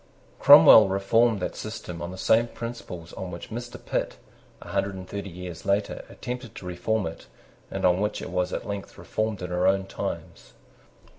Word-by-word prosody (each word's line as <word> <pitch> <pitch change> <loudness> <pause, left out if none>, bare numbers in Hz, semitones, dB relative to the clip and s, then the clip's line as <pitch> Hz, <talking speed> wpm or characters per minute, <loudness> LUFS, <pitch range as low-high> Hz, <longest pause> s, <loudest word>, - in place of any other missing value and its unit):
Cromwell 110 -2 +9
reformed 100 +3 +2
that - - -3
system 90 -6 -6
on 85 - -4
the 95 - -8
same 115 +5 +3
principles 115 -9 -7
on 95 - -6
which 85 +3 -8
Mr. 120 +2 -6
Pitt, - - -2 0.4
a - - -12
hundred 100 0 -1
and 95 -1 -8
thirty 100 0 -5
years 90 -2 -8
later, 100 +1 0
attempted 125 -2 -7
to - - -9
reform 90 +4 -1
it, 80 0 -7 0.4
and - - -2
on 90 +1 +3
which 105 0 -1
it - - -7
was 90 0 0
at - - -4
length 100 -1 -6
reformed 110 -3 -3
in 90 - -5
our 90 0 +2
own 95 0 +2
times. - - -6
95 Hz, 180 wpm, -26 LUFS, 90-110 Hz, 0.4 s, Cromwell